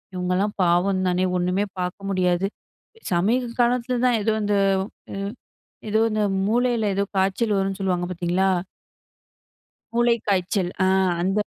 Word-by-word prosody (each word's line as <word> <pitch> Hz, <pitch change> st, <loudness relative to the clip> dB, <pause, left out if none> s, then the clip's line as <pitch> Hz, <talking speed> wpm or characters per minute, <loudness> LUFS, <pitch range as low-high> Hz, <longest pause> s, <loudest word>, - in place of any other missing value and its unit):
இவங்கலாம் 180 Hz, +3 st, 0 dB
பாவம் 185 Hz, +2 st, +2 dB
தானே 180 Hz, +1 st, +1 dB
ஒண்ணுமே 180 Hz, +3 st, 0 dB
பாக்க 180 Hz, 0 st, -3 dB
முடியாது. 185 Hz, 0 st, +1 dB, 0.6 s
சமீப 225 Hz, +8 st, +2 dB
காலத்துல 245 Hz, +1 st, +1 dB
தான் 245 Hz, -2 st, +3 dB
ஏதோ 220 Hz, +2 st, +1 dB
இந்த, 205 Hz, 0 st, +1 dB, 0.6 s
ம். 195 Hz, 0 st, -3 dB, 0.6 s
ஏதோ 220 Hz, +1 st, +2 dB
இந்த 215 Hz, 0 st, 0 dB, 0.2 s
மூளையில 235 Hz, -1 st, +1 dB
ஏதோ 200 Hz, -, +1 dB
காய்ச்சல் 195 Hz, +3 st, +1 dB
வரும்ன்னு 195 Hz, 0 st, -1 dB
சொல்லுவாங்க, 180 Hz, -2 st, 0 dB
பாத்தீங்களா? 180 Hz, +2 st, +1 dB, 1.4 s
மூளைக்காய்ச்சல். 205 Hz, -6 st, +1 dB
அ -, -, +3 dB, 0.4 s
அந்த 195 Hz, +3 st, +1 dB
195 Hz, 120 wpm, -23 LUFS, 180-220 Hz, 1.4 s, தான்